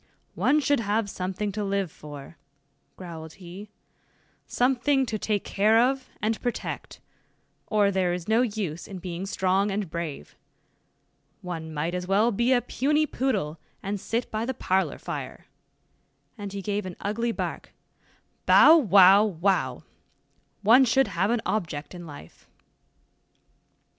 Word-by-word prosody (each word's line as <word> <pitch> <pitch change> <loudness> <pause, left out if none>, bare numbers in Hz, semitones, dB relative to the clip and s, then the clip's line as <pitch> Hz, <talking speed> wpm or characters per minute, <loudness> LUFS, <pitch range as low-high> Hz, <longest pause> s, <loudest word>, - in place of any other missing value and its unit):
"One 300 - +2
should 285 -1 +2
have 210 -1 -1
something 190 +3 -3
to 210 +1 -3
live 195 -3 -1
for," 145 +1 -11 0.6
growled 160 -3 -9
he, 190 +3 -11 0.8
"something 265 +2 +2
to 220 -3 -3
take 210 -1 -1
care 215 +3 +3
of 260 +2 +1
and 220 +1 0
protect, 245 -1 -4 0.7
or 205 -2 +2
there 185 -2 +1
is 175 -1 -4
no 220 +2 +3
use 205 -9 -3
in 195 - -7
being 180 +1 -5
strong 190 +1 +1
and 195 -4 -3
brave. 160 - -6 1.1
One 165 -3 -5
might 155 +3 -2
as 180 0 -3
well 210 +5 +3
be 235 +4 +1
a 250 -2 +4
puny 300 +4 +1
poodle, 205 - -2 0.2
and 200 +1 -3
sit 235 +2 -2
by 215 +1 -2
the 260 +2 -3
parlor 190 -2 0
fire," - - -7 0.9
and 205 -4 -7
he 200 0 -6
gave 205 -1 -2
an 180 - -7
ugly 230 +3 -1
bark, - - -5 0.8
"bow, 320 - +8
wow, 200 -5 +7
wow! 195 -1 0 0.8
one 235 +6 +7
should 265 +2 +3
have 185 +4 0
an 235 -1 0
object 160 -8 -3
in 175 -2 -9
life." 145 - -13
200 Hz, 140 wpm, -26 LUFS, 180-230 Hz, 1.1 s, bow